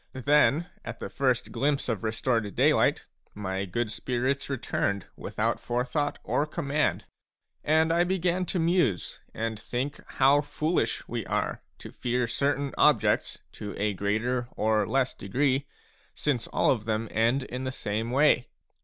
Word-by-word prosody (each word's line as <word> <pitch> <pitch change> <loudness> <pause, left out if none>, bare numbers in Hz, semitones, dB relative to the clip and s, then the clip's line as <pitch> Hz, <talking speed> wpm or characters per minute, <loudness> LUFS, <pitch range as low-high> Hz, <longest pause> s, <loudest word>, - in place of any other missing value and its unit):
Then 145 +5 +3 0.2
at - - -7
the - - -5
first 130 -4 0
glimpse 140 +4 0
of 115 -3 -2
restored 115 -2 0
daylight - - +3 0.3
m 105 - -7
y 95 0 -2
good 110 +4 -2
spirits 130 +4 -1
returned 100 -7 -1
without - - -2
forethought 125 +5 -1
or 150 - 0
command. 150 0 -1 0.6
And 160 +2 +3
I 170 +1 +4
began 180 0 0
to - - -1
muse 165 - +1
and 110 -1 -3
think 130 +6 -3
how 140 +2 +5
foolish 145 -4 -1
we 120 -1 -3
are - - -1 0.2
to - - -10
fear 125 0 -1
certain 140 +3 -1
objects - - +3
to 105 -2 -7
a 105 0 0
greater 110 +6 -1
or 110 -1 +2
less 135 -1 +1
degree, 135 +6 0 0.5
since 135 -6 -1
all - - +2
of 110 -5 -1
them 110 0 -1
end 115 +5 +2
in 125 0 -5
the 130 - -2
same 110 -1 -3
way. 130 -1 +3
125 Hz, 150 wpm, -28 LUFS, 110-145 Hz, 0.6 s, how